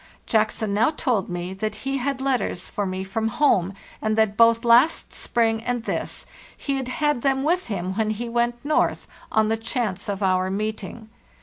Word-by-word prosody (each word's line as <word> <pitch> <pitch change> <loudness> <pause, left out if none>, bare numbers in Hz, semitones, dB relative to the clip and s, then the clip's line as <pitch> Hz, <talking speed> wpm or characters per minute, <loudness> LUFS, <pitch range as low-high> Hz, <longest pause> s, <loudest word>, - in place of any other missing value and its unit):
Jackson 215 -1 +1
now 215 +6 +3
told 250 - -1
me 175 +1 -4
that 215 +2 -3
he 270 0 0
had 275 +1 -2
letters 255 -9 -1
for 205 -1 -3
me 185 0 -3
from 220 +4 -2
home, 220 - +2 0.3
and 215 0 0
that 220 -2 +2
both 230 +1 +5
last 240 +7 +4
spring 225 -1 0
and 245 -1 -2
this - - -4 0.3
he 275 -1 -2
had 265 -2 -3
had 295 0 0
them 270 0 +1
with 350 +5 +1
him 190 -4 -3
when 220 -1 +1
he 220 +3 -3
went 240 0 +1
north, 305 - +1 0.2
on 220 0 +3
the 225 +1 +1
chance 225 -4 -3
of 200 0 -2
our 185 0 +2
meeting. 215 +2 -4
225 Hz, 185 wpm, -24 LUFS, 205-245 Hz, 0.3 s, both